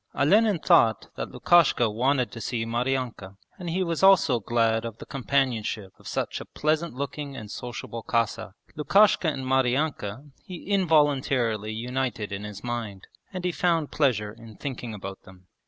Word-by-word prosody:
Olenin 205 +7 +4
thought 115 -7 +3
that - - -4
Lukashka 170 -8 +4
wanted 125 +4 +1
to 115 - -8
see 115 -1 -2
Maryanka 120 -4 -2 0.2
and 175 -2 -5
he 185 +3 0
was 170 -3 -2
also 185 -10 +5
glad 115 0 +1
of 115 -1 -6
the - - -10
companionship 120 -7 -1
of - - -13
such - - -3
a - - -8
pleasant 155 -1 -1
looking 140 +1 -5
and 105 -1 -8
sociable 115 -1 -6
Cossack. 115 -3 -1 0.2
Lukashka 175 +1 +4
and 135 -2 -5
Maryanka 130 -1 0
he 180 -2 -9
involuntarily 140 - +2
united 120 -1 -3
in 100 +1 -5
his 105 -1 -8
mind, 115 -5 -5 0.3
and 185 -2 -5
he 180 - +1
found 165 -4 0
pleasure 105 -8 +1
in 115 -1 -13
thinking 125 -5 -6
about 95 -1 -8
them. 95 -1 -17
125 Hz, 155 wpm, -26 LUFS, 110-150 Hz, 0.3 s, also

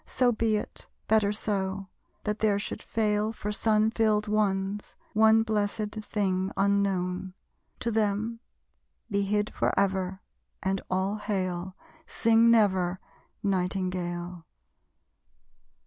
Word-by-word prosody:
So 250 -1 +2
be 225 -1 +1
it, - - -7 0.2
better 215 -2 +3
so: 195 -2 -2 0.4
that 210 0 -2
there 210 -2 +3
should 200 - -4
fail 215 -1 0
For 210 -2 -4
sun 215 0 +2
filled 215 -2 +2
ones, 205 -1 -1 0.2
one 220 +1 +5
blessèd 215 0 -1
thing 190 -3 -1
unknown. 190 -2 0 0.5
To 235 - 0
them, 220 +1 0 0.7
be 200 - +2
hid 210 +1 0
forever, 190 -1 0 0.4
and 190 0 0
all 190 +3 0
hail! 185 -3 -3 0.3
Sing 230 0 +4
never, 190 -5 +3 0.4
Nightingale. 180 -3 -2
205 Hz, 105 wpm, -28 LUFS, 190-215 Hz, 0.7 s, one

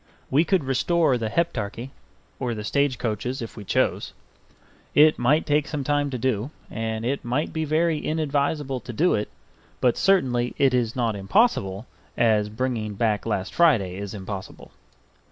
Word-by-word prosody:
We 150 +5 +4
could 185 -2 +2
restore 135 +3 +2
the 115 -3 -2
Heptarchy 120 -5 -2 0.5
or 125 -3 -2
the 105 - -5
stage 140 +3 +1
coaches 120 +3 -3
if 115 - -7
we 105 - -8
chose. - - 0 0.8
It 155 +1 +6
might 140 +6 +3
take 150 0 +1
some 145 -3 -3
time 145 +1 +1
to 130 - -3
do, 120 0 -1 0.2
and 110 0 -3
it 140 +3 -1
might 125 +5 -1
be 160 0 -1
very 160 +1 +1
inadvisable 145 -3 -1
to 120 - -8
do 170 +10 +2
it; 105 - -1 0.5
but 125 -2 +2
certainly 125 -11 +2
it 135 -2 +3
is 120 -3 0
not 115 -4 0
impossible 100 - +1 0.3
as 110 -3 +3
bringing 110 -2 -3
back 110 0 0
last 95 -3 -2
Friday 115 - +3
is 100 0 -6
impossible. 95 -1 -8
125 Hz, 160 wpm, -24 LUFS, 110-145 Hz, 0.8 s, It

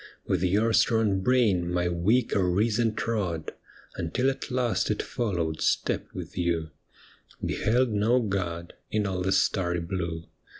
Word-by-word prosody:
' - - -38
With 90 - +1
your 105 +5 +2
strong 110 -5 +3
brain 100 -7 +2
my 90 0 +1
weaker 100 +4 +2
reason 110 +4 +1
trod. 95 -9 -2 0.5
Until 125 +11 0
at 135 - -7
last 125 -2 0
it 105 - 0
followed 85 -9 -2
step - - 0
with - - -8
you, 85 -3 -1 0.7
Beheld 120 +2 +1
no 110 +4 +3
God 90 -6 -3 0.2
in 105 -1 0
all 95 -2 -2
the 95 +1 0
starry 90 -3 +1
blue. 85 -1 -3
95 Hz, 140 wpm, -27 LUFS, 85-115 Hz, 0.7 s, strong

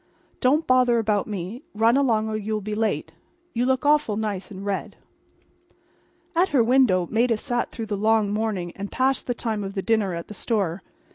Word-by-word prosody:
Don't 290 +6 +3
bother 255 -2 +4
about 210 -2 +1
me. 205 +3 -5
Run 225 +3 +4
along 230 -6 +2
or 220 - -2
you'll 215 0 -2
be 210 +1 -5
late. 210 -8 -1 0.4
You 245 +2 0
look 260 +2 +1
awful 290 -8 +3
nice 210 -3 -3
in 195 -2 -8
red." 200 -1 -3 1.4
At 360 +3 +3
her 265 -5 +3
window 225 -8 +3
Maida 230 0 +2
sat 240 +1 -1
through 225 - -6
the 210 -1 -3
long 215 0 +2
morning 210 -5 -2
and 200 0 -6
past 265 +1 0
the 245 - -1
time 220 -3 -2
of 195 +1 -6
the 195 - -2
dinner 215 -5 +1
at 170 - -6
the - - -8
store. 195 -5 -1
220 Hz, 190 wpm, -24 LUFS, 200-245 Hz, 1.4 s, bother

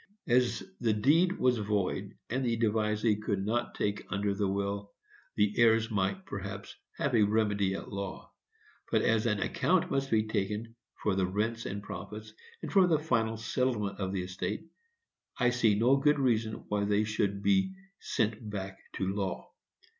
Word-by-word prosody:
As 125 0 +2 0.2
the 115 -3 +2
deed 165 - +3
was 125 -2 +2
void, 100 -1 -1
and 130 +2 0
the 115 -2 +1
devisee 110 -1 +1
could 100 -2 -2
not 120 +3 -1
take 105 0 -1
under 100 0 0
the 100 0 0
will, 100 +1 -2 0.4
the 105 0 +2
heirs 115 -1 +4
might, 105 - -1
perhaps, 100 - -6 0.2
have 140 - 0
had 115 -3 +4
a 105 - +5
remedy 100 -3 +1
at - - -7
law; 100 -1 -5 0.6
but, - - +3
as 115 0 +2
an 105 -2 +1
account 175 - +1
must 135 0 0
be 110 -1 +3
taken 110 +1 -2 0.3
for 105 - +2
the 95 -1 +1
rents 110 +4 -1
and 100 +1 -5
profits, 110 +1 -8 0.3
and - - -4
for 190 -2 +6
the 165 -3 +4
final 115 -7 0
settlement 110 -2 -1
of 95 -1 -2
the 95 -2 -2
estate, 95 - -4 0.7
I 125 -1 +3
see 115 -4 +3
no 125 +5 +4
good 150 +2 +3
reason 115 -5 0
why 105 -1 0
they 105 +1 +2
should 100 -2 -1
be 190 - +2 0.2
sent 110 -2 -1
back 95 -2 -5
to 95 - -2
law. 95 0 -3
110 Hz, 170 wpm, -30 LUFS, 100-120 Hz, 0.7 s, for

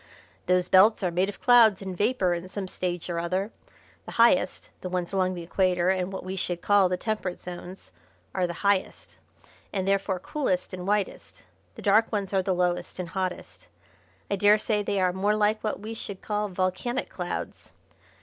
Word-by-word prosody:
"Those 180 0 +3
belts 205 +4 +5
are 180 - +1
made 185 +3 +1
of 205 - -8
clouds 225 -6 +5
or 190 -1 -5
vapour 205 -2 +1
in 175 +1 -4
some 190 0 -5
stage 180 -2 -3
or 170 -1 -2
other. 185 +5 -2 0.6
The - - -7
highest 230 -6 +3
the 185 - -4
ones 180 0 -3
along 185 -1 +1
the 175 - -6
Equator 180 0 +1
and 185 0 -1
what 190 - -6
we 185 +1 -5
should 175 -2 -3
call 200 -2 +4
the 180 - 0
Temperate 210 -3 -3
Zones 180 - -9 0.4
are 185 -2 +1
the 170 +3 -7
highest, 200 -2 0 0.5
and 190 -1 -2
therefore 195 -1 +1
coolest 185 -4 -2
and 180 0 -6
whitest. 205 -1 -2 0.3
The - - -10
dark 215 +2 +4
ones 200 -3 -2
are 190 - +3
the 185 0 0
lowest 175 0 -1
and 180 -2 -5
hottest. 185 0 -5 0.6
I 200 - +1
daresay 210 +1 +3
they 200 -1 -1
are 185 -1 +2
more 200 +3 +1
like 215 +1 +1
what 215 - -2
we 220 +2 -5
should 200 -3 -8
call 210 0 -1
volcanic 185 +7 -1
clouds. - - -6
190 Hz, 185 wpm, -26 LUFS, 180-205 Hz, 0.6 s, belts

